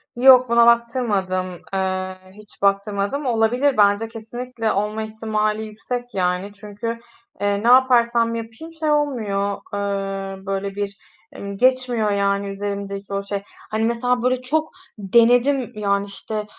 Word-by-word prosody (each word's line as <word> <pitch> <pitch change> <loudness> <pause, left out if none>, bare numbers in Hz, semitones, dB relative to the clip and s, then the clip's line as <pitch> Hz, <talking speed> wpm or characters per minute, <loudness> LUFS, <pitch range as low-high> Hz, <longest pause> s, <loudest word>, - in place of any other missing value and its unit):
Yok, 255 0 +7
buna 235 0 +5
baktırmadım, 205 -7 +1
eee, 185 -1 -2 0.2
hiç 210 +1 -17
baktırmadım. 200 +6 0
Olabilir. 245 +3 +2
Bence 205 +2 +4
kesinlikle 225 +1 -4
olma 210 +2 -1
ihtimali 215 0 -2
yüksek, 245 +3 -6
yani. 180 +1 0
Çünkü, 215 +3 -5 0.4
eee, 205 0 0
ne - - +1
yaparsam 240 -2 +4
yapayım 230 +9 -8
şey 310 -1 +1
olmuyor, 215 -9 0 0.2
ııı, 195 -1 -3
böyle 195 0 -3
bir 200 -1 -4 0.4
emm, 200 -4 -7
geçmiyor, 250 -3 +2
yani, 200 0 0
üzerimdeki 200 0 -5
o 200 0 -1
şey. 200 0 -4 0.3
Hani, 220 +1 0
mesela, 240 +1 0
böyle 255 0 +1
çok 310 +5 -1 0.3
denedim, 240 +5 +3
yani, 200 -1 0
işte, 210 +1 -5
215 Hz, 130 wpm, -21 LUFS, 200-240 Hz, 0.4 s, Yok